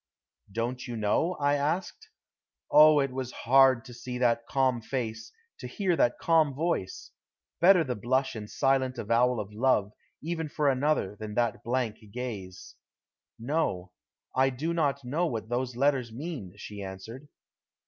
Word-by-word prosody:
"Don't 120 +5 -3
you 120 -1 -5
know?" 110 - +1
I 145 0 +2
asked. 170 - -2 0.6
Oh, 155 0 +8
it 135 -1 -1
was 130 -1 -4
hard 130 0 +4
to 125 - -10
see 125 +1 -6
that 120 -1 +1
calm 130 -3 +1
face, 115 -2 -4 0.3
to 125 - -6
hear 180 +7 0
that 120 -6 +2
calm 160 -4 +2
voice. 160 - -2 0.5
Better 180 -1 +6
the 130 - -2
blush 130 +5 0
and 105 -2 -7
silent 130 -1 +1
avowal 120 +2 +2
of 105 0 -6
love, 105 -3 +1 0.3
even 160 0 -4
for 145 0 +1
another, 135 -6 0
than 105 -1 -7
that 120 0 0
blank 120 -2 -1
gaze. 105 -7 -7 0.6
"No. 115 - -2 0.4
I 130 +1 +4
do 150 +6 -3
not 140 -5 0
know 160 +8 0
what 115 -6 -4
those 125 0 -2
letters 130 -2 +1
mean," 130 - -6
she 105 -1 -8
answered. 105 +8 -8
130 Hz, 150 wpm, -28 LUFS, 115-145 Hz, 0.6 s, Oh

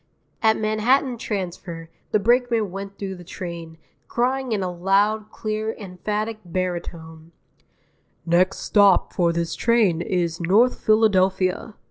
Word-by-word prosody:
At 220 -1 +4
Manhattan 235 +4 +1
Transfer 175 -5 -5 0.2
the - - +3
brakeman 230 -1 +2
went 195 +1 -7
through 195 -1 -5
the 175 - -11
train, 170 -2 -8 0.3
crying 255 +1 -1
in 205 -3 0
a 180 - -2
loud, 200 +4 +1
clear, 215 0 -3
emphatic 210 +3 -4
barytone: 170 -2 -5 0.9
"Next 180 +3 +2
stop 200 -3 +4
for 170 -2 +2
this 170 0 -2
train 220 -8 +2
is 175 -2 -1
North 210 +9 +3
Philadelphia!" 195 -2 +2
195 Hz, 120 wpm, -23 LUFS, 175-220 Hz, 0.9 s, At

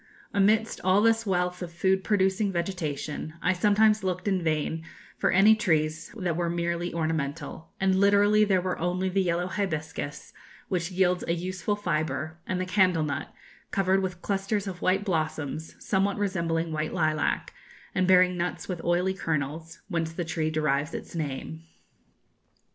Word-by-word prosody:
Amidst 210 +3 +2
all 190 +3 +4
this 225 -1 +3
wealth 180 -1 0
of 175 -2 -5
food 190 +2 +1
producing 195 0 +2
vegetation, 160 -4 -3
I 185 - +2
sometimes 210 +2 +3
looked 185 +1 -2
in 190 -2 +1
vain 160 0 -1 0.4
for - - +2
any 205 +4 +6
trees 155 -7 0
that 180 -5 -1
were 170 0 0
merely 170 0 -1
ornamental; 160 -1 -3
and 190 0 +3
literally 205 +2 +5
there 195 -3 +3
were 185 -1 -2
only 180 +2 0
the 195 +1 +1
yellow 175 -1 0
hibiscus, 160 -6 -4 0.4
which 175 -2 -1
yields 180 -1 +1
a 170 - +1
useful 185 +3 -2
fibre, 155 -4 -2
and 185 - -1
the 185 - -1
candle 185 -3 +3
nut, 150 - -3 0.4
covered 195 0 +2
with 180 -2 -4
clusters 200 +1 -1
of 185 -3 -6
white 195 +2 +2
blossoms, 155 -4 -2
somewhat 200 0 0
resembling 170 -5 -1
white 155 +2 -2
lilac, 155 -3 0 0.4
and 185 -1 +1
bearing 180 -1 +5
nuts 175 0 -3
with 180 -3 -4
oily 180 +2 +1
kernels, 160 -2 -3
whence 165 -4 -2
the 175 +1 -3
tree 160 -1 -1
derives 150 -1 0
its - - -7
name." 135 - -4
180 Hz, 155 wpm, -27 LUFS, 160-190 Hz, 0.4 s, any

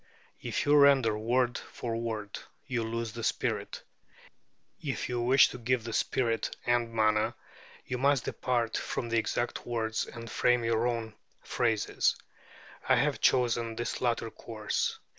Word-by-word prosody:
If - - -2
you 145 +1 +5
render 140 -6 +5
word 120 +3 +1
for 115 -2 -5
word, 110 -3 -4 0.3
you 120 -3 -1
lose 115 0 -3
the 115 - -6
spirit; - - -2 1.0
if 135 -3 -3
you 120 -1 -2
wish 130 +3 +6
to 125 - -8
give 120 0 0
the 115 0 -5
spirit 115 -1 0
and 120 -1 +1
manner, 110 -1 +2 0.5
you 125 -1 -3
must 140 -1 +2
depart 120 -3 -1
from 120 - -3
the 115 0 +2
exact 120 +1 -2
words 110 -2 -1
and 115 0 -9
frame 125 +1 +2
your 115 +1 +1
own 115 -2 -3 0.3
phrases. 115 -4 +1 0.7
I - - +7
have - - +1
chosen 120 -2 +2
this 120 +1 -3
latter 115 -2 0
course. 110 -2 -3
115 Hz, 145 wpm, -30 LUFS, 115-125 Hz, 1.0 s, I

